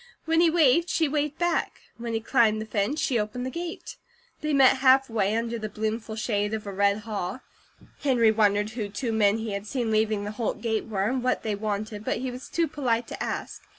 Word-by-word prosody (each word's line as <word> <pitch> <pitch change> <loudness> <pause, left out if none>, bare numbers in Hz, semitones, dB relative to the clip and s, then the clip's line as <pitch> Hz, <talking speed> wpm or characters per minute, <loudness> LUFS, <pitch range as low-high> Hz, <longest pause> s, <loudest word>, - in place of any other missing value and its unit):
When 325 +1 +3
he 340 - +5
waved, 330 +1 +4
she 320 - +2
waved 295 0 -1
back. 345 0 -1 0.2
When 235 0 -4
he 225 - -1
climbed 225 -3 +3
the 215 - -4
fence 220 +7 -1
she 245 -4 +1
opened 215 +4 -3
the 260 - -3
gate. 340 +2 -6 0.4
They 305 - -1
met 270 -2 +5
halfway, 260 -6 +3
under 230 0 -2
the 215 -1 -4
bloomful 220 +1 -3
shade 210 -1 -1
of 215 - -6
a 200 - -5
red 200 +2 +2
haw. 210 +1 -4 0.6
Henry 240 -6 +4
wondered 210 -1 +2
who 220 -3 -4
two 230 +4 -3
men 210 -1 +3
he 225 -1 -4
had 200 +1 -4
seen 240 -2 -1
leaving 215 -1 +1
the 205 - -4
Holt 225 +1 -3
gate 220 -2 -1
were, 200 -4 -1
and 255 +5 0
what 255 - 0
they 215 - -1
wanted, 210 0 -3
but - - -1
he 255 0 -3
was 250 +1 -9
too 335 -1 +1
polite 245 -6 -1
to - - -4
ask. - - -4
225 Hz, 220 wpm, -26 LUFS, 210-260 Hz, 0.6 s, he